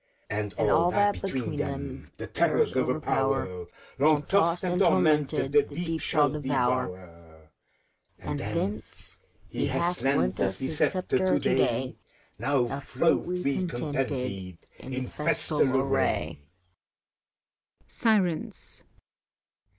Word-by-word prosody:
And 105 Hz, -1 st, -3 dB
all 135 Hz, +11 st, +3 dB
that, 205 Hz, +2 st, +2 dB
between 130 Hz, -, -3 dB
them, -, -, -5 dB
the -, -, -6 dB
terrors -, -, +1 dB
o'erpower, 90 Hz, -2 st, 0 dB, 0.3 s
Long 150 Hz, +1 st, +4 dB
tossed 175 Hz, -2 st, +2 dB
and 180 Hz, +1 st, 0 dB
tormented, 150 Hz, -6 st, +3 dB
the 145 Hz, 0 st, +6 dB
Deep 165 Hz, +2 st, -4 dB
shall 150 Hz, -1 st, +3 dB
devour; 95 Hz, -, -3 dB, 0.7 s
And -, -, -4 dB
thence 105 Hz, +2 st, -4 dB, 0.3 s
he 140 Hz, -, -2 dB
hath 170 Hz, +7 st, -1 dB
lent 135 Hz, -, +1 dB
us 95 Hz, -1 st, 0 dB
his 135 Hz, +4 st, -3 dB
sceptre 185 Hz, -1 st, +1 dB
to 185 Hz, 0 st, +3 dB
day. -, -, +1 dB, 0.2 s
— -, -, -35 dB
Now 135 Hz, -1 st, 0 dB
float 140 Hz, +4 st, +1 dB
we 180 Hz, -1 st, -1 dB
contented, 125 Hz, -, -3 dB, 0.2 s
in 130 Hz, -1 st, -5 dB
festal 150 Hz, +2 st, -1 dB, 0.2 s
array. 135 Hz, -, 0 dB
140 Hz, 105 wpm, -27 LUFS, 120-165 Hz, 0.7 s, the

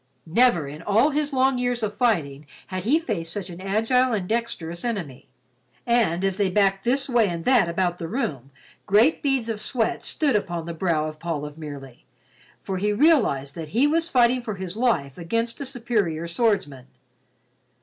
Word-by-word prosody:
Never 175 Hz, -, +3 dB
in 150 Hz, +3 st, -8 dB
all 225 Hz, -, +3 dB
his 295 Hz, 0 st, -1 dB
long 260 Hz, -1 st, +2 dB
years 245 Hz, -1 st, -1 dB
of 210 Hz, -1 st, -2 dB
fighting 155 Hz, -, 0 dB, 0.2 s
had 185 Hz, -1 st, -4 dB
he 280 Hz, +8 st, +4 dB
faced 200 Hz, -, -3 dB
such 190 Hz, -1 st, -5 dB
an 175 Hz, +1 st, -9 dB
agile 225 Hz, +6 st, +2 dB
and 195 Hz, -4 st, -2 dB
dexterous 180 Hz, -7 st, -3 dB
enemy, 175 Hz, -, -4 dB, 0.6 s
and 220 Hz, -7 st, +2 dB
as 195 Hz, -1 st, 0 dB
they 200 Hz, -2 st, +1 dB
backed 195 Hz, 0 st, +2 dB
this 265 Hz, +3 st, +1 dB
way 240 Hz, -5 st, +3 dB
and 170 Hz, -2 st, -4 dB
that 245 Hz, -9 st, +4 dB
about 175 Hz, 0 st, -1 dB
the 165 Hz, -, -4 dB
room, 150 Hz, -, -3 dB, 0.4 s
great 220 Hz, +10 st, +4 dB
beads 270 Hz, -5 st, 0 dB
of 220 Hz, -2 st, -3 dB
sweat 225 Hz, 0 st, -1 dB
stood 290 Hz, -6 st, 0 dB
upon 175 Hz, -5 st, -2 dB
the 170 Hz, -, -5 dB
brow 165 Hz, -2 st, 0 dB
of 155 Hz, 0 st, -8 dB
Paul 160 Hz, -3 st, -3 dB
of 150 Hz, 0 st, -8 dB
Merely, 140 Hz, -5 st, -9 dB, 0.6 s
for 190 Hz, -, -3 dB
he 210 Hz, +2 st, +1 dB
realized 210 Hz, -, +3 dB
that 160 Hz, 0 st, -6 dB
he 265 Hz, -, +5 dB
was 325 Hz, +3 st, +1 dB
fighting 250 Hz, -2 st, +3 dB
for 220 Hz, -4 st, -5 dB
his 190 Hz, -1 st, -6 dB
life 180 Hz, -, 0 dB
against 230 Hz, +9 st, -2 dB
a 280 Hz, -, -3 dB
superior 210 Hz, -, -1 dB
swordsman. 170 Hz, -, -1 dB
200 Hz, 180 wpm, -24 LUFS, 165-245 Hz, 0.6 s, he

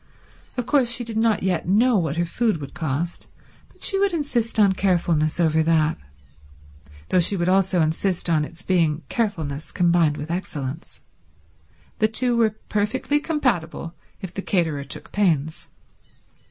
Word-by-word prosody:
Of 245 Hz, -, -1 dB
course 265 Hz, -3 st, +3 dB
she 235 Hz, +1 st, 0 dB
did 225 Hz, -1 st, -5 dB
not 220 Hz, -3 st, +2 dB
yet 185 Hz, -3 st, 0 dB
know 230 Hz, +6 st, +4 dB
what 165 Hz, -5 st, 0 dB
her 170 Hz, -, +1 dB
food 220 Hz, +3 st, 0 dB
would 140 Hz, -2 st, -8 dB
cost, 165 Hz, 0 st, -3 dB, 0.4 s
but -, -, -15 dB
she 390 Hz, -, +2 dB
would 395 Hz, -2 st, +2 dB
insist 250 Hz, -9 st, -1 dB
on 200 Hz, -2 st, +6 dB
carefulness 175 Hz, -5 st, +1 dB
over 160 Hz, -2 st, +3 dB
that, 160 Hz, -1 st, +2 dB, 1.1 s
though 185 Hz, -, +3 dB
she 195 Hz, +3 st, +4 dB
would 175 Hz, 0 st, -1 dB
also 190 Hz, -1 st, +3 dB
insist 175 Hz, +4 st, -1 dB
on 160 Hz, -3 st, +2 dB
its 170 Hz, +5 st, -8 dB
being 165 Hz, -4 st, +1 dB
carefulness 160 Hz, -, -2 dB
combined 170 Hz, -4 st, +2 dB
with 150 Hz, +3 st, -5 dB
excellence. 155 Hz, -4 st, -5 dB, 1.0 s
The 215 Hz, -, +4 dB
two 240 Hz, +2 st, +1 dB
were 220 Hz, -2 st, +2 dB
perfectly 225 Hz, +8 st, 0 dB
compatible 180 Hz, -, -1 dB, 0.3 s
if 185 Hz, -, -6 dB
the 195 Hz, -, -4 dB
caterer 160 Hz, -8 st, -1 dB
took 140 Hz, -, -5 dB
pains. 160 Hz, -7 st, 0 dB
180 Hz, 155 wpm, -23 LUFS, 160-220 Hz, 1.1 s, on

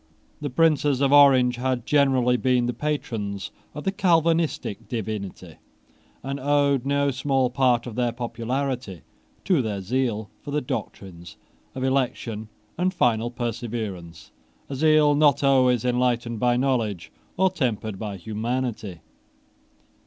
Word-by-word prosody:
The 145 Hz, -, -3 dB
princes 145 Hz, -1 st, +2 dB
of 140 Hz, 0 st, +2 dB
Orange 130 Hz, -4 st, +6 dB
had 125 Hz, -1 st, -2 dB
generally 135 Hz, -4 st, +3 dB
been 125 Hz, -1 st, +2 dB
the 120 Hz, -, -1 dB
patrons 110 Hz, -10 st, -3 dB, 0.2 s
of 150 Hz, -, -6 dB
the 195 Hz, -, 0 dB
Calvinistic 165 Hz, -, +1 dB
divinity, 110 Hz, -4 st, -5 dB, 0.7 s
and 135 Hz, +2 st, -4 dB
owed 140 Hz, -1 st, +1 dB
no 140 Hz, 0 st, +1 dB
small 135 Hz, -1 st, 0 dB
part 125 Hz, -2 st, +2 dB
of 120 Hz, -, -6 dB
their 120 Hz, +1 st, 0 dB
popularity 120 Hz, -, -4 dB, 0.4 s
to 180 Hz, -7 st, +3 dB
their 105 Hz, -4 st, -3 dB
zeal 110 Hz, 0 st, -2 dB
for -, -, -9 dB
the 145 Hz, +1 st, 0 dB
doctrines 85 Hz, -, -7 dB, 0.4 s
of 130 Hz, -, -4 dB
election 120 Hz, -5 st, -1 dB, 0.3 s
and 185 Hz, +1 st, +2 dB
final 120 Hz, -, +1 dB
perseverance, 110 Hz, -9 st, -5 dB, 0.4 s
a 140 Hz, -, -4 dB
zeal 155 Hz, +1 st, +4 dB
not 145 Hz, -1 st, +3 dB
always 130 Hz, -3 st, +3 dB
enlightened 120 Hz, -2 st, 0 dB
by 120 Hz, 0 st, +2 dB
knowledge 115 Hz, -9 st, -1 dB, 0.3 s
or 190 Hz, 0 st, +3 dB
tempered 110 Hz, -, -2 dB
by 105 Hz, -3 st, -5 dB
humanity. 110 Hz, -2 st, -4 dB
125 Hz, 130 wpm, -24 LUFS, 110-140 Hz, 0.7 s, Orange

